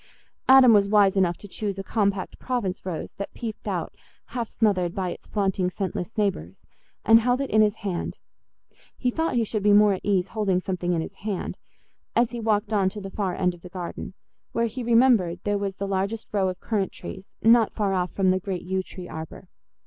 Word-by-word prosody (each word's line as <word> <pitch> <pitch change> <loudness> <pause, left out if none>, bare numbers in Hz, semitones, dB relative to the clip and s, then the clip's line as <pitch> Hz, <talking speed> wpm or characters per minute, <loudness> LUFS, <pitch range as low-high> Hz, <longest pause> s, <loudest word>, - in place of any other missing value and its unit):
Adam 260 -3 +9
was 200 -1 +4
wise 200 -2 +5
enough 180 -3 +2
to 205 - -11
choose 200 0 -4
a 195 - -4
compact 200 -2 -1
Provence 235 -8 -2
rose 175 -4 -4
that 200 - -6
peeped 225 -2 -6
out - - -2 0.4
half 235 -3 -2
smothered 185 -6 +1
by 185 -2 -1
its - - -10
flaunting 195 -3 0
scentless 185 +2 -4
neighbours, 180 - -2 0.4
and 225 0 +8
held 245 +2 +1
it 275 - -3
in 215 - +5
his 210 0 +3
hand—he 210 +5 -6
thought 320 0 -1
he 235 - +3
should 215 -1 -2
be 205 +1 +4
more 205 0 +6
at 190 - -4
ease 190 -2 +1
holding 200 -5 +1
something 180 -1 -2
in 165 - 0
his - - -6
hand—as 220 +3 -4
he 240 - -5
walked 215 -1 0
on 195 -3 +3
to 210 - -8
the 195 -1 -7
far 190 -4 -2
end 180 -2 +1
of 175 - -15
the 180 - -10
garden, 180 -1 -6 0.4
where 230 - +1
he 235 +3 -4
remembered 230 -7 +4
there 205 0 0
was 200 -1 -3
the 200 - -4
largest 195 +3 -2
row 195 -2 +1
of 185 - -6
currant 205 -4 -1
trees, 190 +1 -9 0.2
not 225 0 +5
far 205 -3 -1
off 180 -1 0
from 190 -2 +2
the 185 - +1
great 185 -1 -4
yew 190 +1 -1
tree 185 -1 -10
arbour. 160 +3 -8
200 Hz, 205 wpm, -25 LUFS, 185-220 Hz, 0.4 s, Adam